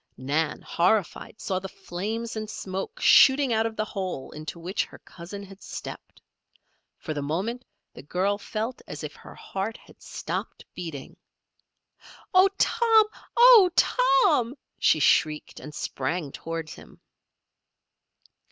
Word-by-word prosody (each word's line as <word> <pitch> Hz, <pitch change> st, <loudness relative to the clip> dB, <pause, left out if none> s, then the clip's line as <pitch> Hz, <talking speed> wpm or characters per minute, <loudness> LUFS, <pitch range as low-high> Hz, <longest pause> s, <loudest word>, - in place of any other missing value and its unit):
Nan, 145 Hz, +4 st, -1 dB
horrified, 185 Hz, +4 st, 0 dB
saw 185 Hz, -2 st, -2 dB
the 195 Hz, +1 st, -7 dB
flames 215 Hz, +6 st, -5 dB
and 215 Hz, -1 st, -4 dB
smoke 190 Hz, -3 st, -5 dB
shooting 265 Hz, -2 st, +6 dB
out 220 Hz, 0 st, +2 dB
of 225 Hz, -, -7 dB
the 215 Hz, -, -1 dB
hole 185 Hz, -9 st, -5 dB
into 155 Hz, +2 st, -7 dB
which 180 Hz, +4 st, -1 dB
her -, -, -14 dB
cousin 185 Hz, +4 st, -10 dB
had 195 Hz, 0 st, -13 dB
stepped. -, -, -9 dB, 0.8 s
For 155 Hz, -, -5 dB
the 145 Hz, -, -3 dB
moment 195 Hz, -, -2 dB, 0.3 s
the -, -, -10 dB
girl 190 Hz, +8 st, -1 dB
felt 225 Hz, +4 st, -4 dB
as -, -, -7 dB
if -, -, -6 dB
her -, -, -13 dB
heart 195 Hz, +4 st, -4 dB
had -, -, -20 dB
stopped -, -, -5 dB
beating. 160 Hz, -6 st, -7 dB, 1.2 s
"Oh, 370 Hz, +1 st, +7 dB
Tom! 450 Hz, -2 st, +4 dB, 0.3 s
Oh, 475 Hz, -6 st, +9 dB
Tom!" 360 Hz, -, +3 dB, 0.2 s
she 155 Hz, -, +4 dB
shrieked, 150 Hz, +2 st, +2 dB
and 150 Hz, -, -9 dB
sprang 150 Hz, +1 st, -3 dB
toward 165 Hz, 0 st, -6 dB
him. -, -, -13 dB
195 Hz, 135 wpm, -26 LUFS, 165-230 Hz, 1.2 s, Oh